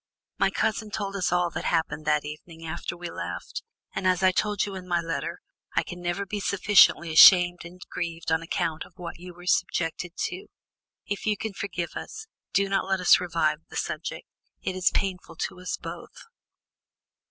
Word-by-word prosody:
My 195 - +4
cousin 215 +2 -1
told 200 -1 -3
us 185 -3 0
all 175 -1 +2
that - - -4
happened 155 -2 0
that 150 -1 +2
evening 160 +2 -9
after 170 +1 -4
we 175 -1 -6
left, - - -5 0.3
and, 190 - -1
as 185 0 +2
I 185 - +6
told 205 +2 +1
you 200 - -6
in 185 -1 -7
my 175 -1 +2
letter, 165 +1 -3 0.4
I - - +3
can 180 0 -8
never 175 +3 -2
be 205 +2 -4
sufficiently 195 -4 +5
ashamed 175 +1 +9
and 175 +2 -11
grieved 165 -1 -4
on 160 0 +2
account 165 -1 -2
of - - -17
what 175 -2 -7
you 180 +1 -9
were 175 0 -13
subjected 170 -1 0 0.2
to. 390 +3 -8 0.6
If 205 +1 -4
you 210 -1 +2
can 220 0 -4
forgive 175 -4 -4
us, 435 +1 -7 0.3
do 200 0 +2
not 195 -1 +1
let 190 -1 +1
us 180 - +6
revive 165 -4 0
the - - -11
subject; - - -3 0.4
it 185 - -2
is 185 0 +3
painful 185 -4 -2
to 180 - -4
us 180 - -3
both." - - -9
180 Hz, 185 wpm, -27 LUFS, 170-195 Hz, 0.6 s, ashamed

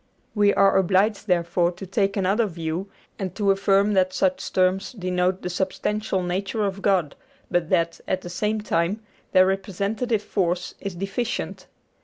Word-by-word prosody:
We 205 -2 +4
are 195 -1 +5
obliged, 195 +3 +2
therefore, 175 -1 +2
to 185 +3 -8
take 195 +1 0
another 200 +4 +2
view, 170 +2 -4 0.3
and 190 -3 -4
to 200 -2 +2
affirm 195 +1 +3
that 185 -1 +2
such 185 -1 0
terms 185 +4 +1
denote 185 -2 -1
the 180 - -2
substantial 190 +2 -1
nature 195 +5 -2
of 195 0 -3
God, 185 -8 +1 0.4
but 175 -2 +1
that, 170 -2 +1
at 185 - 0
the 175 - -8
same 210 +4 -1
time, 190 +1 0 0.3
their 185 -1 +6
representative 200 +4 -1
force 180 -2 -1
is 195 -3 -5
deficient. 195 +6 -3
190 Hz, 155 wpm, -24 LUFS, 180-200 Hz, 0.4 s, their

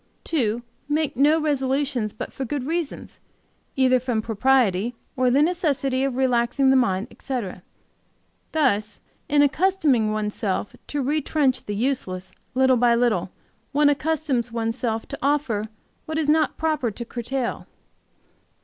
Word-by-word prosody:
"2. 240 -7 0 0.3
Make 300 0 0
no 295 +4 +4
resolutions 270 -5 0
but - - -7
for 270 - -4
good 265 +1 -3
reasons, 325 0 -4 0.6
either 255 -1 +4
from 245 -2 -1
propriety 225 -1 +2 0.2
or 255 -1 +2
the 275 +4 +4
necessity 285 -6 0
of 270 -2 -1
relaxing 260 +1 +2
the - - +4
mind, 205 -6 +2
etc. 230 -9 -5 0.9
Thus, 220 -9 +1 0.3
in 290 0 +5
accustoming 290 - +2
one's 210 -1 -2
self 200 0 -2
to 290 -2 -2
retrench 290 -1 0
the 205 - -2
useless 190 -6 -2 0.2
little 260 -1 +4
by 240 0 +4
little, 235 -2 +1 0.4
one 290 +1 +5
accustoms 290 -5 0
one's 225 -1 -1
self 225 -3 -2
to - - -6
offer 265 -7 0 0.4
what 315 0 -3
is 315 -2 0
not 310 0 +2
proper 310 -6 0
to 235 +3 -7
curtail. 240 +2 -3
260 Hz, 140 wpm, -24 LUFS, 230-290 Hz, 0.9 s, in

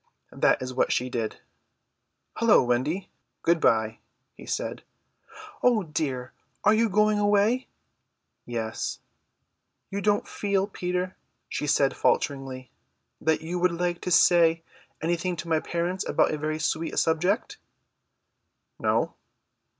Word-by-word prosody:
That - - +2
is 130 0 -5
what 130 - +1
she 125 +1 0
did. 115 -3 -3 1.0
"Hullo, 230 -8 +5
Wendy, 140 +10 -1 0.3
good 170 0 +3
bye," 110 -1 +2 0.3
he - - -13
said. - - -3 0.8
"Oh 235 -4 +3
dear, 140 -6 -3 0.3
are 210 - +5
you 225 +1 +3
going 210 +1 +3
away?" 210 +5 +2 0.8
"Yes." 115 -2 -3 0.9
"You 200 +1 -2
don't 205 0 +1
feel, 200 -2 0
Peter," 180 -2 -3 0.3
she 150 - -3
said 140 -1 +3
falteringly, 135 -2 -1 0.5
"that 160 0 +1
you 170 +3 -3
would 180 0 +2
like 175 0 -1
to - - -3
say 165 -2 +5 0.4
anything 175 +2 0
to 170 0 -7
my 160 -1 +2
parents 175 +3 -2
about - - +3
a 155 - -2
very 155 +1 -2
sweet 160 +1 -2
subject?" 180 +7 +1 1.2
"No." - - +1
170 Hz, 125 wpm, -26 LUFS, 140-195 Hz, 1.2 s, Hullo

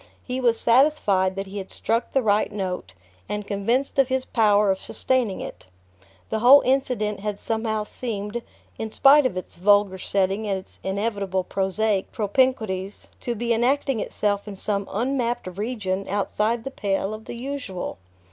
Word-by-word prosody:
He 255 +1 -3
was 235 -2 +3
satisfied 230 -8 +3
that 195 0 -3
he 200 +1 -6
had 190 - -7
struck 230 +1 -1
the 270 - +2
right 210 0 +2
note, 185 - -4 0.4
and 210 0 -3
convinced 235 +8 0
of 270 - +5
his 260 0 -1
power 210 -3 +3
of 190 - -2
sustaining 250 -7 -1
it. - - -8 0.6
The 220 - 0
whole 260 +5 +8
incident 250 -6 0
had 205 0 -4
somehow 220 -1 -1
seemed, 210 0 -4 0.4
in 220 - -3
spite 275 +2 +6
of 185 - -6
its 185 - -7
vulgar 200 0 +3
setting 195 +3 0
and 195 -1 0
its 185 - -12
inevitable 195 -1 -1
prosaic 195 +2 0
propinquities, 210 -4 0
to 240 - -3
be 235 +1 0
enacting 260 +2 +1
itself 205 0 -1
in 205 - -6
some 200 0 -2
unmapped 245 +1 -1
region 200 -3 -2
outside 210 +3 0
the 270 - -5
pale 195 -3 -1
of 215 0 -8
the - - -7
usual. 250 - -5
210 Hz, 160 wpm, -24 LUFS, 195-240 Hz, 0.6 s, whole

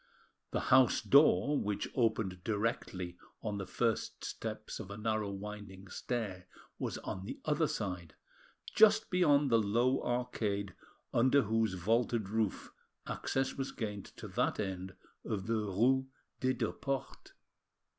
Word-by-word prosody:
The - - -1
house 130 -2 +6
door, 140 +2 +5
which 105 -1 -2
opened 110 -7 0
directly 100 -5 -2 0.2
on 105 -2 -2
the 95 - -5
first 115 +2 -1
steps 110 -1 -5
of 105 -4 -7
a 100 - -6
narrow 110 -1 -1
winding 100 -1 -7
stair, 100 -6 -3 0.3
was - - -2
on 95 - -5
the - - -6
other 155 +1 +2
side, 90 - -4 0.6
just 220 0 +6
beyond 145 -7 +4
the 115 - +6
low 120 +5 +2
arcade 105 -5 -1 0.4
under 130 +3 +5
whose 110 -2 +1
vaulted 110 +2 +1
roof 110 -2 -1 0.3
access 135 0 -1
was 135 0 -3
gained 105 -4 -4
to - - -7
that - - 0
end 95 -2 -3 0.3
of 100 -3 -3
the 115 - 0
rue 115 +6 +2 0.3
des 130 0 +2
Deux 120 - -1
Portes. 135 -1 -4
110 Hz, 135 wpm, -33 LUFS, 100-125 Hz, 0.6 s, house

